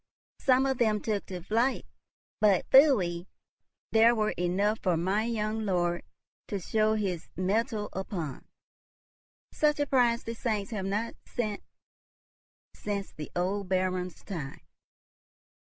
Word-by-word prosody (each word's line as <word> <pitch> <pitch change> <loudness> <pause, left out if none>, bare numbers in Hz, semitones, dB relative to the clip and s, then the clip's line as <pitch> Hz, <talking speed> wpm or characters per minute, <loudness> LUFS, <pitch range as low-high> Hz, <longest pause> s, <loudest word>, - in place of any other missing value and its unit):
Some 260 0 +4
of 265 -2 0
them 215 -3 +3
took 210 -1 -2
to 180 -3 -6
flight, 235 +7 +1 0.5
but, 205 -4 +3
pfui, 195 - +5 0.6
there 225 +2 +6
were 215 -1 +1
enough 195 +5 0
for 180 -4 +1
my 195 +6 +1
young 220 -1 -1
lord 175 -3 0 0.5
to 200 - -3
show 215 +4 +1
his 190 -6 -2
mettle 210 +3 0
upon. 175 -7 -5 1.0
Such 300 -1 +2
a 290 - +2
prize 240 -4 +2
the 230 - -4
saints 215 -3 -2
have 200 -4 -3
not 210 +4 -1
sent 215 -4 -3 1.1
since 200 -1 -4
the 150 - -8
old 185 +2 -1
Baron's 185 -1 -1
time." 155 -9 -6
205 Hz, 125 wpm, -29 LUFS, 185-225 Hz, 1.1 s, there